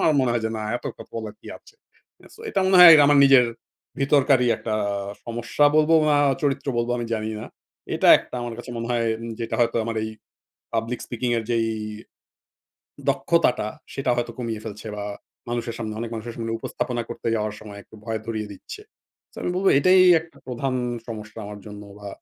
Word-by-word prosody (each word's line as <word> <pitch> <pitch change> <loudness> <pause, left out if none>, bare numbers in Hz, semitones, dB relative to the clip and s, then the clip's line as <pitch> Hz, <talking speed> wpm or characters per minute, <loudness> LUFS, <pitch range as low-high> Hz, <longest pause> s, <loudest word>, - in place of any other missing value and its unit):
আমার 155 - +4
মনে 130 - +1
হয় 120 -2 -1
যে 110 - -1
না, 110 - -4
এত - - -13
কথা - - -9
বলার 110 -2 -6
কি - - -16
আছে? - - -21 0.6
সো - - -16
এটা 195 - 0
মনে 190 0 +4
হয় 175 -2 +12 0.2
আমার 145 -1 +5
নিজের 135 -3 +6 0.5
ভিতরকারই 135 -2 +3
একটা 110 - -3 0.5
সমস্যা 120 +5 0
বলবো 155 +1 +4
বা 150 - +4 0.3
চরিত্র 140 -1 0
বলবো 120 +1 -1
আমি 120 - -3
জানি 110 0 -3
না। - - -7 0.5
এটা - - +2
একটা - - -11
আমার 120 -1 -5
কাছে 120 +1 -8
মনে 115 - -4
হয় 120 -1 +1
উম 115 - -6
যেটা 115 - -3
হয়তো 120 0 +2
আমার 115 -1 -3
এই 110 - -3 0.6
পাবলিক 115 +2 -2
স্পিকিং 120 +1 -3
এর 115 - -3
যেই 115 -1 +1 1.4
দক্ষতাটা, 160 -10 +2 0.3
সেটা 135 - -1
হয়তো 120 -1 -2
কমিয়ে 115 -3 -4
ফেলছে 105 0 -8
বা 100 - -4 0.4
মানুষের 120 -1 -3
সামনে 110 -2 -4
অনেক 115 -1 -4
মানুষের 115 +1 -6
সামনে 115 -1 -3
উপস্থাপনা 120 +1 -3
করতে 120 - -4
যাওয়ার 105 -1 -2
সময় 105 -1 -10
একটু - - -21
ভয় 110 -1 -3
ধরিয়ে 110 -2 -4
দিচ্ছে। 415 - -10 0.5
তো - - -24
আমি - - -1
বলবো 195 +1 +3
এটাই 185 +4 +6 0.2
একটা 160 0 -17
প্রধান 130 +1 -2 0.3
সমস্যা 110 -1 -8
আমার 105 0 -8
জন্য 105 0 -9 0.2
বা 100 - -7
115 Hz, 190 wpm, -23 LUFS, 110-130 Hz, 1.4 s, হয়